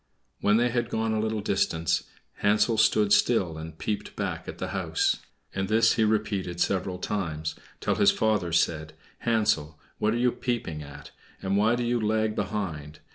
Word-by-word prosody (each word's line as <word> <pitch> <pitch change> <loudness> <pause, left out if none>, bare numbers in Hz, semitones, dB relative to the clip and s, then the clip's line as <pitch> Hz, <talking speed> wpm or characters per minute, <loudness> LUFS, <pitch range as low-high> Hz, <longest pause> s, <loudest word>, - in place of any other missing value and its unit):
When 105 +1 +3
they 120 +1 +3
had 120 0 -1
gone 110 -1 0
a 110 - 0
little 110 0 -1
distance, 85 -5 0 0.3
Hansel 105 +2 +2
stood 105 -2 +4
still, 90 -9 +2
and 80 0 -8
peeped 105 +4 -4
back - - -3
at - - -6
the - - -4
house; - - 0 0.4
and 95 0 -1
this 110 +2 +4
he 110 - +2
repeated 105 -5 0
several 95 0 0
times, 80 -6 -3 0.3
till - - 0
his - - +4
father 105 -6 +1
said, 80 -1 +1 0.3
"Hansel, 105 -10 +1 0.2
what 105 +2 +1
are - - 0
you 125 0 +3
peeping 115 -14 -3
at, 70 -1 -11 0.3
and 95 +1 -1
why 110 +4 +3
do 120 - -2
you 120 0 0
lag 110 0 +1
behind? 80 -10 -4
105 Hz, 175 wpm, -27 LUFS, 85-110 Hz, 0.4 s, stood